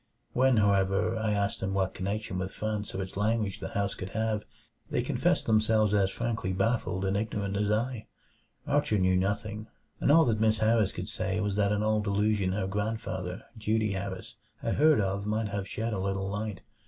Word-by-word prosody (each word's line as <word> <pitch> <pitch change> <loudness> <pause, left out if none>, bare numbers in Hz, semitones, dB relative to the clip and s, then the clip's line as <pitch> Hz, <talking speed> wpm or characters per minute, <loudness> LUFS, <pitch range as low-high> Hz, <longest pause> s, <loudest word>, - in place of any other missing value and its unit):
When, 130 -1 +4
however, 100 -2 +2
I 110 -1 0
asked 100 -1 0
them 95 0 -2
what 95 -1 0
connection 100 0 -3
with 95 0 -2
France 105 -2 -3
or 95 - -1
its 95 - -9
language 105 -1 0
the - - -4
house 100 -1 0
could 95 - -6
have, 110 -1 0 0.5
they - - 0
confessed - - +1
themselves 110 -1 +3
as 100 -2 +3
frankly 115 -4 -2
baffled 95 -1 0
and 95 +1 0
ignorant 100 -1 -2
as 105 0 0
I. 110 +1 -1 0.6
Archer 105 - +2
knew 95 -1 +3
nothing, 105 +3 -1 0.3
and - - +3
all 165 +2 +7
that 110 -3 +1
Miss 110 0 +3
Harris 110 -1 +3
could - - -5
say - - -1
was 105 -2 -1
that 100 -1 +2
an 105 0 +1
old 110 -1 +1
allusion 100 -1 +1
her 95 -1 -1
grandfather, 100 -2 -3
Dutee 110 -1 0
Harris, 95 -1 -5 0.3
had - - 0
heard 155 -1 +5
of 100 0 -1
might 110 0 0
have 100 -1 -3
shed 110 +2 -3
a 100 - -2
little 95 0 -1
light. 105 0 -4
105 Hz, 190 wpm, -29 LUFS, 95-110 Hz, 0.6 s, all